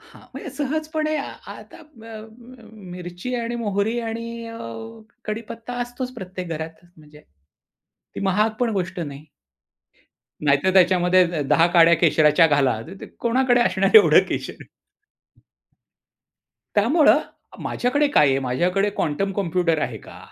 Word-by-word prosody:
हां. 455 Hz, +1 st, -18 dB
म्हणजे -, -, -8 dB
सहजपणे 310 Hz, +2 st, -2 dB
आ 285 Hz, -, -4 dB, 0.2 s
आता -, -, -13 dB
अ, 300 Hz, -8 st, -17 dB, 0.5 s
अ, 220 Hz, -, -16 dB
मिरची 180 Hz, +2 st, -8 dB
आणि 235 Hz, 0 st, -3 dB
मोहरी 205 Hz, +3 st, -1 dB
आणि 230 Hz, 0 st, -6 dB
अ, 230 Hz, -, -9 dB, 0.7 s
कढीपत्ता 230 Hz, +2 st, -6 dB
असतोच 245 Hz, +1 st, -5 dB
प्रत्येक 185 Hz, -5 st, -7 dB
घरात 160 Hz, +1 st, -7 dB
म्हणजे. 150 Hz, -1 st, -17 dB, 0.9 s
ती -, -, -6 dB
महाग 200 Hz, +3 st, +1 dB
पण 240 Hz, -, +1 dB
गोष्ट 185 Hz, -2 st, -3 dB
नाही. 145 Hz, -2 st, -7 dB, 1.2 s
नाहीतर, 145 Hz, +5 st, +2 dB
"त्याच्यामध्ये 180 Hz, 0 st, +4 dB
द 150 Hz, -4 st, -2 dB
10 165 Hz, -, +4 dB
काड्या 170 Hz, 0 st, +7 dB
केशराच्या 155 Hz, 0 st, +4 dB
घाला." 135 Hz, -7 st, +1 dB
तर 185 Hz, -, -10 dB
ते -, -, -8 dB
कोणाकडे 245 Hz, +1 st, +2 dB
असणार 195 Hz, -4 st, +1 dB
एवढं 440 Hz, -, +7 dB
केशर. -, -, -5 dB, 2.1 s
त्यामुळं 265 Hz, +10 st, +4 dB, 0.4 s
माझ्याकडे 285 Hz, +4 st, 0 dB
काय 150 Hz, -, +5 dB
आहे, 135 Hz, 0 st, +2 dB
माझ्याकडे 175 Hz, +11 st, 0 dB
क्वांटम 195 Hz, +3 st, -2 dB
कॉम्प्युटर 175 Hz, -4 st, 0 dB
आहे 115 Hz, -3 st, -4 dB
का? -, -, -14 dB
195 Hz, 130 wpm, -22 LUFS, 165-235 Hz, 2.1 s, काड्या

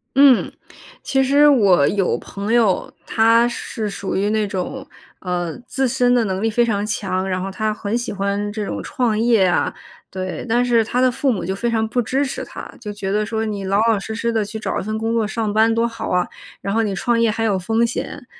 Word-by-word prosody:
嗯， 275 Hz, -2 st, +5 dB, 0.5 s
其 270 Hz, 0 st, +1 dB
实 285 Hz, +3 st, +5 dB
我 200 Hz, -, +5 dB
有 195 Hz, -1 st, +1 dB
朋 200 Hz, +2 st, -5 dB
友， 225 Hz, -6 st, +2 dB
他 230 Hz, +1 st, +4 dB
是 225 Hz, -2 st, -4 dB
属 195 Hz, -1 st, -4 dB
于 200 Hz, +2 st, +1 dB
那 215 Hz, -1 st, +1 dB
种， 190 Hz, -2 st, -4 dB, 0.3 s
呃， 175 Hz, -2 st, -3 dB
自 265 Hz, 0 st, 0 dB
身 245 Hz, 0 st, +2 dB
的 240 Hz, -, +3 dB
能 190 Hz, -1 st, -2 dB
力 225 Hz, -, +1 dB
非 235 Hz, +2 st, +2 dB
常 205 Hz, -3 st, 0 dB
强， 190 Hz, -3 st, -2 dB
然 185 Hz, -1 st, -1 dB
后 195 Hz, +1 st, -4 dB
他 215 Hz, +3 st, -1 dB
很 210 Hz, 0 st, -3 dB
喜 240 Hz, 0 st, -4 dB
欢 200 Hz, +1 st, -2 dB
这 210 Hz, 0 st, -4 dB
种 -, -, -4 dB
创 235 Hz, -4 st, -1 dB
业 225 Hz, -4 st, +4 dB
啊。 180 Hz, -, +1 dB, 0.4 s
对， 185 Hz, -1 st, -5 dB
但 240 Hz, +2 st, +2 dB
是 235 Hz, -2 st, +3 dB
他 240 Hz, +3 st, -2 dB
的 255 Hz, 0 st, +4 dB
父 265 Hz, +2 st, 0 dB
母 215 Hz, -, -2 dB
就 190 Hz, -, -2 dB
非 235 Hz, +5 st, -2 dB
常 220 Hz, -1 st, 0 dB
不 245 Hz, +2 st, 0 dB
支 270 Hz, +5 st, 0 dB
持 265 Hz, -, -4 dB
他， -, -, -9 dB
就 210 Hz, -3 st, -6 dB
觉 195 Hz, -1 st, -4 dB
得 210 Hz, +1 st, +1 dB
说 220 Hz, +1 st, -2 dB
你 205 Hz, -2 st, -4 dB
老 195 Hz, +1 st, +1 dB
老 215 Hz, -, +1 dB
实 220 Hz, +3 st, -6 dB
实 235 Hz, +1 st, -1 dB
地 220 Hz, -2 st, +1 dB
去 210 Hz, +2 st, -6 dB
找 -, -, -2 dB
一 -, -, -4 dB
份 215 Hz, +2 st, -3 dB
工 225 Hz, +1 st, -1 dB
作， 225 Hz, -2 st, +1 dB
上 215 Hz, -1 st, -2 dB
班 220 Hz, +1 st, +4 dB
多 230 Hz, 0 st, +2 dB
好 230 Hz, -1 st, -6 dB
啊， 180 Hz, 0 st, +1 dB, 0.3 s
然 195 Hz, -, -2 dB
后 225 Hz, -, +2 dB
你 205 Hz, -3 st, -1 dB
创 235 Hz, +4 st, +1 dB
业 230 Hz, -1 st, +3 dB
还 225 Hz, +1 st, -1 dB
有 205 Hz, -4 st, +1 dB
风 225 Hz, +5 st, +1 dB
险， 230 Hz, -, -5 dB
220 Hz, 250 characters per minute, -20 LUFS, 200-235 Hz, 0.5 s, 嗯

